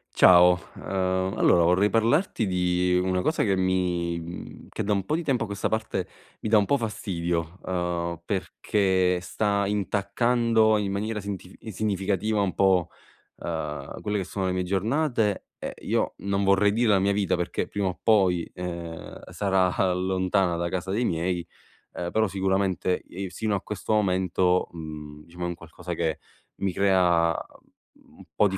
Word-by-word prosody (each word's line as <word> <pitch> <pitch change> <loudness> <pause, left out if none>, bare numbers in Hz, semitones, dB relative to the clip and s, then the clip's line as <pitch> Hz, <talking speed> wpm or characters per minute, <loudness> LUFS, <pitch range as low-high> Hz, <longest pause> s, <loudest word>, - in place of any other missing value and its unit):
Ciao. 90 0 +7 0.2
Ehm, 95 0 -1
allora 85 - +5
vorrei 90 +4 +4
parlarti 115 - +2
di 90 0 +1
una 90 0 0
cosa 160 - +1
che 100 -3 +2
mi, 90 -2 0
mhmm 85 +1 -8
che - - -4
da 105 - +1
un 100 -2 -1
po' 155 - 0
di 170 - -2
tempo 135 -6 +1
a - - -2
questa 100 0 -2
parte 110 -4 -2 0.3
mi 110 - -2
dà 110 - +6
un 105 - +3
po' 140 - +2
fastidio, 85 - -3
uhm, 85 -2 -2
perché 95 -1 +1
sta 100 +2 0
intaccando 110 +3 +2
in 100 -2 -1
maniera 105 +2 -2
sintifi 95 -2 -7
significativa 105 0 -1
un 95 -3 0
po', 95 -3 +3 0.5
ehm, 75 -4 -5
quelle 105 0 -1
che 100 - -1
sono 95 +1 -3
le 90 - 0
mie 90 0 0
giornate 110 - 0
e - - -5
io - - 0
non 100 0 -1
vorrei 100 +1 +4
dire 115 +1 +2
la 100 -2 +5
mia 100 +1 +2
vita, 100 -2 +1
perché 85 -1 -2
prima 100 -2 -2
o 90 - -4
poi, 95 -6 +3
ehm, 85 -2 -6
sarà, 95 -2 +1
ah, 95 -1 +2
lontana 95 0 +1
da 85 0 -2
casa 95 +1 -3
dei 115 +5 0
miei, 85 0 -1 0.5
ehm, 85 - -4
però 110 0 +2
sicuramente 95 -1 0
ev 95 +1 -6
sino 110 +3 -2
a 95 - -2
questo 105 +1 -3
momento, 90 -3 +2
mhmm, 75 -2 -8
diciamo 85 +1 -8
è - - 0
un 85 - -2
qualcosa 85 +2 -8
che 80 -2 -1 0.4
mi 95 -2 -2
crea 90 -4 +3 0.3
un - - -34 0.2
un - - -18
po' 105 - +4
di 95 -1 -3
95 Hz, 170 wpm, -26 LUFS, 90-105 Hz, 0.5 s, Ciao